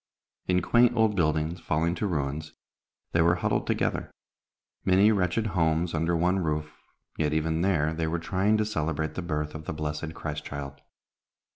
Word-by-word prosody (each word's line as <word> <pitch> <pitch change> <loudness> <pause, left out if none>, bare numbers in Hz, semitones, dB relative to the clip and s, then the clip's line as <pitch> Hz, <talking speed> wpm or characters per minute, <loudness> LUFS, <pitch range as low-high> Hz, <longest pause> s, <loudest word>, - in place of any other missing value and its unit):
In 90 -1 +2
quaint 120 +3 +4
old 110 -2 +3
buildings, 80 0 0
falling 80 +2 0
to 105 - -2
ruins, 75 -2 -3 0.6
they 85 - +3
were 85 +1 +4
huddled 85 - -1
together, - - 0 0.7
many 95 +3 +5
wretched 100 +2 +1
homes 80 0 +1
under 85 +2 +1
one 90 +3 +2
roof, 75 -2 -2 0.4
yet 75 -1 +1
even 80 +1 0
there 80 -5 +2
they 80 0 -1
were 85 +2 -1
trying 95 +5 +1
to 110 - +1
celebrate 80 -6 -2
the - - -4
birth 75 -3 -3
of 80 0 -8
the - - -3
blessed 75 +1 -4
Christ 75 -1 -5
child. 70 -2 -7
80 Hz, 165 wpm, -27 LUFS, 75-90 Hz, 0.7 s, many